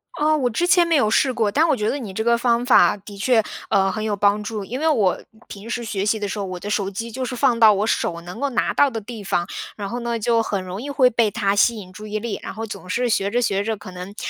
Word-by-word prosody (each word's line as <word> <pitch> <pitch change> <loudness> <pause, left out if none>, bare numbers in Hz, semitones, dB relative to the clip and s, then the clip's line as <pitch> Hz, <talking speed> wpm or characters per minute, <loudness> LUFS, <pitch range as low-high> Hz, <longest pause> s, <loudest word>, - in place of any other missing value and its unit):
啊， 310 +1 +2
我 255 -5 +1
之 290 +10 0
前 350 -1 +4
没 335 - +2
有 265 -8 +3
试 265 +2 +3
过。 220 -4 0
但 315 +9 +3
我 305 - +3
觉 215 -2 -1
得 285 - -2
你 215 -6 -6
这 220 +3 -2
个 235 0 +3
方 240 0 +1
法 250 -4 +5
的 200 +1 -12
确， 225 +1 +3 0.3
呃， 195 -1 +2
很 215 - -4
有 215 -1 -1
帮 205 +1 +2
助。 210 -2 -5
因 250 +7 -5
为 320 - +1
我 210 - +2 0.3
平 205 +3 -10
时 240 0 -3
学 200 -2 -2
习 220 +1 +1
的 205 - -3
时 205 - -4
候， 200 - -2
我 185 -1 -6
的 205 - -6
手 200 -2 0
机 225 +4 -6
就 260 +3 -4
是 250 0 -4
放 245 -1 +2
到 220 -2 +7
我 205 +2 0
手 170 -6 -1
能 180 +6 -9
够 280 +1 0
拿 245 - 0
到 285 - +4
的 225 -4 -4
地 220 -1 -9
方， 175 -2 0 0.3
然 200 -2 -5
后 240 +3 -4
呢， 235 -1 -2
就 230 +1 +2
很 200 -4 -2
容 185 +4 -6
易 285 - -6
会 270 -3 +4
被 225 -2 +2
它 200 -2 0
吸 230 +3 +4
引 185 -3 -10
注 210 +2 -9
意 215 0 -3
力。 225 0 -4
然 - - -7
后 225 - -4
总 195 -4 -9
是 245 +6 0
学 200 -3 +1
着 245 +3 0
学 200 -2 0
着 220 0 -2
可 195 -2 -10
能， 180 +3 -9
220 Hz, 320 characters per minute, -21 LUFS, 200-245 Hz, 0.3 s, 到